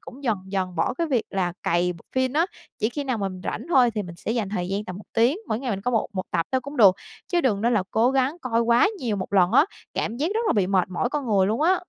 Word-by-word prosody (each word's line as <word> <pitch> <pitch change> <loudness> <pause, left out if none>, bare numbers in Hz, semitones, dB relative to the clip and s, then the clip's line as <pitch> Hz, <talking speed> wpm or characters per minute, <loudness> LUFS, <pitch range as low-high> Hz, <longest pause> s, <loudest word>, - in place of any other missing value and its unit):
cũng 265 +2 -12
dần 225 -5 +2
dần 190 -2 -3
bỏ 205 +10 0
cái 335 +4 -1
việc 255 -7 +1
là 180 -2 -1
cày 175 +1 +1
bộ 170 - -15
phin 260 -1 +1
á. 320 +4 +2 0.3
Chỉ 215 - +1
khi 285 +4 -4
nào 255 -4 -1
mình 190 -2 -4
rảnh - - -4
thôi 260 -7 +5
thì 210 - -1
mình 175 -3 -9
sẽ 190 - -5
dành 225 -4 -1
thời 180 -3 -3
gian 200 +2 -2
tầm 185 - -7
1 205 - -10
tiếng, 235 +7 +3
mỗi 215 - 0
ngày 255 0 -3
mình 195 -3 -2
coi 250 +5 -1
một 225 - +1
một 190 -2 -2
tập 165 -2 0
thôi 260 - +2
cũng 280 +3 -8
được, 195 -6 +7 0.4
chứ 350 - +3
đừng 220 -10 +1
nên 235 +3 +2
là 210 - +2
cố 235 +3 +3
gắng 270 +3 +1
coi 230 -2 +1
quá 235 +5 +4
nhiều 230 - -1
một 185 - -5
lần 185 -1 +4
á, 275 +5 +6 0.3
cảm 225 - -2
giác 290 +5 0
rất 450 - +1
là - - +3
bị 200 -4 +2
mệt 190 -1 +1
mỏi 185 +6 -1
con 290 -2 -2
người 200 -4 +3
luôn 220 +6 0
á. 355 +4 +5
225 Hz, 300 wpm, -24 LUFS, 190-260 Hz, 0.4 s, được